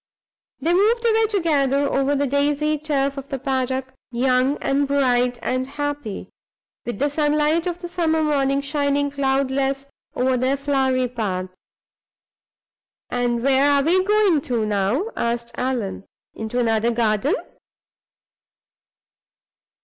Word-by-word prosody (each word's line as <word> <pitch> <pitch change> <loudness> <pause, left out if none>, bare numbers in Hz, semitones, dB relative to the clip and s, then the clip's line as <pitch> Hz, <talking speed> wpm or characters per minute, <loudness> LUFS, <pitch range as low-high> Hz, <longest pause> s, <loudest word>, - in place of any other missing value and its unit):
They 335 - +1
moved 445 +6 +2
away 445 -1 +3
together 285 -8 +1
over 275 +1 +1
the 285 +1 +1
daisied 290 +2 0
turf 280 -2 0
of 275 +1 -7
the 275 - -3
paddock, 260 0 -2 0.2
young 255 +3 +2
and 280 +1 0
bright 250 -3 +2
and 255 +1 -1
happy, 290 -6 -5 0.6
with 240 - -3
the 285 - +1
sunlight 300 +3 +1
of 350 0 -4
the - - -3
summer 325 -2 0
morning 275 -2 +1
shining 285 0 0
cloudless 275 0 0 0.3
over 255 +1 +1
their 260 +3 +1
flowery 265 -2 +1
path. 195 -6 -3 1.6
"And 240 -1 0
where 275 +1 +4
are 280 -1 +3
we 360 +5 +3
going 405 -6 +3
to, 235 -5 -1
now?" 215 - 0
asked 235 0 -2
Allan. 240 -7 -3 0.3
"Into 220 +2 -5
another 225 -1 +2
garden?" 230 - +1
275 Hz, 125 wpm, -22 LUFS, 250-295 Hz, 1.6 s, where